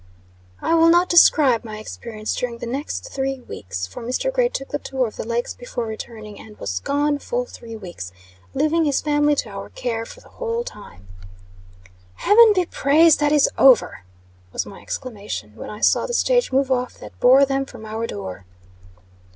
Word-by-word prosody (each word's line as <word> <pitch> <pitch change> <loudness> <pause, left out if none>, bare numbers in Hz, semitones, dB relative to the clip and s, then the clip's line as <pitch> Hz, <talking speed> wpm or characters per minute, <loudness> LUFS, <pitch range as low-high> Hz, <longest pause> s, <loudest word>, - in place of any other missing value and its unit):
I - - +1
will 330 0 +6
not 350 +2 +4
describe 285 -8 +5
my 215 -2 -7
experience 215 0 -6
during 245 -2 -3
the 235 - -6
next 285 - -4
three 270 -1 -2
weeks 95 - -6
for, 95 - -10
Mr. 255 - -2
Gray - - +2
took 270 - -5
the 290 - -3
tour 265 -2 -1
of 220 - -7
the - - -6
Lakes 235 +1 -2
before 245 -1 -5
returning, 220 -1 -8
and 215 -1 -13
was 90 -2 -3
gone 290 - 0
full - - -2
three 230 - -10
weeks, 175 - -8 0.4
leaving 320 +1 +2
his 285 -2 +2
family 295 0 +2
to 235 - -3
our 200 -1 -8
care 230 -2 -4
for - - -12
the - - -19
whole 470 -1 -3
time. 95 - -12 1.1
"Heaven 445 - +6
be 365 -1 +2
praised, 315 +1 +4
that 295 0 +2
is 295 -2 +5
over!" 260 -4 +5 0.5
was - - -2
my 195 - -11
exclamation, 205 - -6
when - - -8
I 210 - -9
saw - - +3
the 485 - -2
stage - - +2
move 270 0 +1
off 250 -1 0
that - - -12
bore 260 +3 +6
them 270 0 -1
from 220 - -11
our 220 +1 -4
door. 95 -2 -7
255 Hz, 185 wpm, -22 LUFS, 215-300 Hz, 1.1 s, will